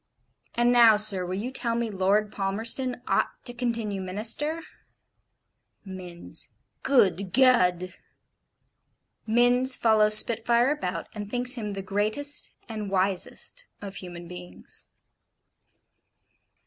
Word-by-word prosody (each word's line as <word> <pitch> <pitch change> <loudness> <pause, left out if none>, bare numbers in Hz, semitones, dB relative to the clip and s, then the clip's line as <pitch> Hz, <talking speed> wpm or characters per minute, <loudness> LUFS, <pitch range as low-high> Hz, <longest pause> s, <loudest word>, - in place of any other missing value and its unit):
And 240 +1 +2
now, 235 -3 +6
sir, 205 -3 +5
will 185 - -3
you 225 +6 -4
tell 235 -3 -2
me 235 -1 -2
Lord 200 +2 +1
Palmerston 225 +6 0
ought - - -1
to 245 - -2
continue 230 -5 -3
Minister?' 225 - -3 1.2
Minns: 180 -3 -8 0.3
'Good 200 -7 +2
Ged!' 185 -8 +2 1.3
Minns 245 +3 +3
follows 215 -2 +4
Spitfire 235 +3 +2
about, 180 - -4
and 205 -1 -7
thinks 245 +2 +1
him 215 -5 -5
the 195 -1 -6
greatest 215 +10 0 0.2
and 215 -3 -6
wisest 195 - -2
of 200 -1 -8
human 175 -2 -9
beings. 180 0 -9
215 Hz, 110 wpm, -26 LUFS, 195-245 Hz, 1.3 s, now